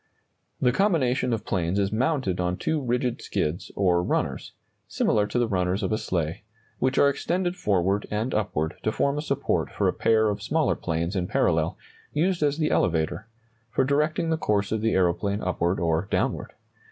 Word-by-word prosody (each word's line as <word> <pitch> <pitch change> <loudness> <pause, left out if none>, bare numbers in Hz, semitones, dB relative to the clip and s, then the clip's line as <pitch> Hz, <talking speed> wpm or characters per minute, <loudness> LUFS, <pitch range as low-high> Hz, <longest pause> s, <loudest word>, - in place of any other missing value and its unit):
] - - -48
The - - +5
combination 130 - +1
of 115 -2 -2
planes 90 0 -1
is 100 -1 +1
mounted 125 - 0
on 90 0 0
two 160 -2 -1
rigid 125 -1 -1
skids, 75 +4 -2
or 90 -3 +3
runners 90 - -2 0.3
(similar 105 -1 +1
to 125 - -2
the 120 -1 +2
runners 95 0 0
of 95 - -1
a 110 - +2
sleigh), 85 -1 -2 0.4
which 130 0 +1
are 140 - +6
extended 175 +5 -1
forward 100 - 0
and 110 +5 -2
upward 80 -6 -1
to 110 - 0
form 140 +5 0
a - - -1
support 140 -2 -1
for - - 0
a - - +2
pair 110 -1 +3
of 105 0 -3
smaller 150 +6 +1
planes 85 +3 -2
in 90 -2 -1
parallel, 80 -2 +1 0.4
used 175 +3 +1
as 145 -1 +2
the 155 -1 0
elevator 85 +5 0 0.4
(for 130 - +1
directing 150 +4 +1
the 160 - +2
course 100 -8 0
of 110 -1 0
the 115 0 +1
aeroplane 95 +3 +1
upward 90 0 0
or 85 +2 0
downward). - - -1
105 Hz, 185 wpm, -26 LUFS, 90-135 Hz, 0.4 s, are